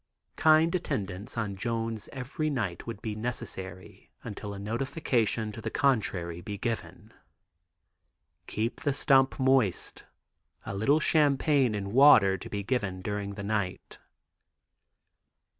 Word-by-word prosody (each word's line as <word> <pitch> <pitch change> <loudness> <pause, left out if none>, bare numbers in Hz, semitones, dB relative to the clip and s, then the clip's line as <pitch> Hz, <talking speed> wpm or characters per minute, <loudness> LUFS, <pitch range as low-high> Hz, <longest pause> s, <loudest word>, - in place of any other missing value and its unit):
"Kind 160 +1 +4
attendance 115 - -3
on 105 -4 -2
Jones 115 +1 -3
every 140 +4 -3
night 110 - -3
would 115 -3 -6
be 110 - -3
necessary 95 -5 -6
until 105 0 -6
a 100 - -6
notification 115 0 -1
to 110 - -8
the - - -3
contrary 100 -11 0
be 100 +2 -6
given." 115 +2 -5 1.3
"Keep 110 +3 -3
the 145 - +1
stump 135 -1 +3
moist; 130 -7 +1 0.6
a - - -4
little 135 +10 +3
champagne 145 -5 +3
and 100 0 -4
water 115 -8 +7
to 95 - -8
be 100 -1 -3
given 100 -5 -2
during 100 -1 -3
the 100 - -6
night." 100 -3 -3
110 Hz, 125 wpm, -29 LUFS, 100-135 Hz, 1.3 s, water